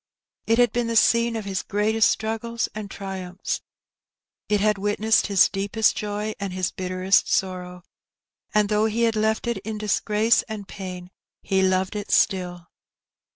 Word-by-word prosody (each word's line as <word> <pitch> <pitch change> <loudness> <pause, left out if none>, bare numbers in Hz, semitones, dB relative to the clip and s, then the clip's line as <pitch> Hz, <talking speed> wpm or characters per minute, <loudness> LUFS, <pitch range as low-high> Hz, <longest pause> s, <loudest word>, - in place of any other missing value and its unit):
It 225 - +3
had 240 -2 +4
been 240 0 -1
the 230 - -2
scene 235 +1 +4
of 220 -2 -4
his 195 -2 -2
greatest 215 +2 +2
struggles 225 +1 -2
and 210 -1 -6
triumphs. 190 -2 -5 0.9
It 210 -1 +2
had 210 -1 +2
witnessed 210 +2 +2
his 200 -3 +5
deepest 205 +3 +1
joy 210 +1 -3
and 200 -2 -4
his 185 -1 -1
bitterest 185 +2 +1
sorrow, 180 -1 -2 0.7
and 210 -1 +3
though 210 0 +2
he 225 +2 0
had 225 -1 +2
left 220 +1 0
it 235 -2 -1
in 215 +2 -5
disgrace 210 +2 +2
and 210 -3 -6
pain, 180 -2 -8 0.3
he 190 -1 +1
loved 190 +1 +1
it 205 -1 -5
still. 180 -3 +1
210 Hz, 155 wpm, -24 LUFS, 190-220 Hz, 0.9 s, his